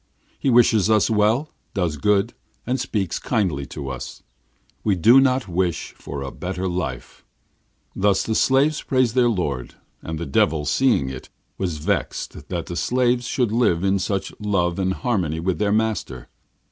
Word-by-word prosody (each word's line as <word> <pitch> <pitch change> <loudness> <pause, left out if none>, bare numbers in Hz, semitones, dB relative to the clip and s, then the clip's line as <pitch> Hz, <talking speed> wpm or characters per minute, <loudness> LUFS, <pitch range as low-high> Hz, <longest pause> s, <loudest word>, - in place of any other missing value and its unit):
He 135 - +1
wishes 115 -4 +4
us 110 0 +3
well, 110 +8 +2 0.2
does 85 -6 -1
good, 105 - +2 0.3
and 130 +2 -1
speaks 95 -6 -2
kindly 90 - -1
to 70 0 -6
us. 65 -1 -7 0.6
We 105 -3 +2
do 115 +9 +6
not 130 -2 +1
wish 90 -1 -1
for 70 -1 -7
a 65 - -5
better 95 +1 -4
life.' 75 -9 -5 0.7
Thus 100 0 +2
the 110 - -2
slaves 135 +6 +3
praised 130 -4 +1
their 125 -1 +4
lord, 75 - -2 0.3
and 80 0 -5
the 85 - -4
Devil, 75 +2 +1
seeing 115 - +2
it, 65 - -9 0.3
was 90 -5 -2
vexed 75 -1 -3
that 85 -1 -4
slaves 125 -1 +1
should 125 -5 0
live 110 -7 +2
in 100 0 +2
such 95 +1 -2
love 95 -4 0
and 95 0 +1
harmony 90 -10 -1
with 90 +2 -1
their 105 -1 +1
master. 110 - -1
95 Hz, 160 wpm, -22 LUFS, 85-115 Hz, 0.7 s, do